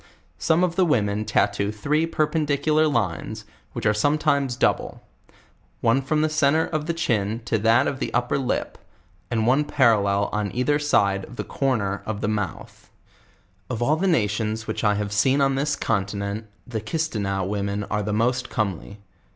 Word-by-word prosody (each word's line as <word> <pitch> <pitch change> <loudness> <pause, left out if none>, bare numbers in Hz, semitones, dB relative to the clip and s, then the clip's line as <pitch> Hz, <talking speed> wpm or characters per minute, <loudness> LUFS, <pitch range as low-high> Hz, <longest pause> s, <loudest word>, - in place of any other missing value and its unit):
Some 165 +2 +2
of 175 -2 0
the 190 - +5
women 110 - +1
tattoo 100 0 +1
three 150 +10 0
per 155 -2 +1
pendicular 155 0 +1
lines, 90 - -2 0.3
which - - -5
are 105 - +4
sometimes 140 +2 +1
double; - - 0 0.8
one 115 +4 +2
from 150 +3 0
the - - +3
centre 155 +1 +2
of 155 -2 -3
tiie 170 0 -2
chin 110 -7 0
to 115 - 0
that 115 +5 +4
of 135 - -2
the - - -3
under 120 +3 0
lip, 130 - -2 0.5
and 110 -2 0
one 135 +5 +3
parallel 105 -8 +2
on 105 -1 -1
either 145 +4 +1
side 100 -9 +2
of 125 - -12
tli5 - - -5
corner 110 -8 -1
of 110 -1 -3
the - - 0
mouth. 105 -4 -4 0.8
Of 120 -1 -2
all 150 +5 +3
the 185 +5 0
nations 110 - 0
which - - -4
I 105 -1 +3
have 105 0 -3
seen 130 +7 +3
on 135 -1 +3
this 145 +2 0
continent, 100 0 -2 0.2
the 115 -3 -4
Kisteneaux 110 -8 -2
women 100 0 -2
are 105 +1 -2
the 105 +1 -3
most 120 +4 0
comely. 100 -1 -3
115 Hz, 175 wpm, -24 LUFS, 105-145 Hz, 0.8 s, the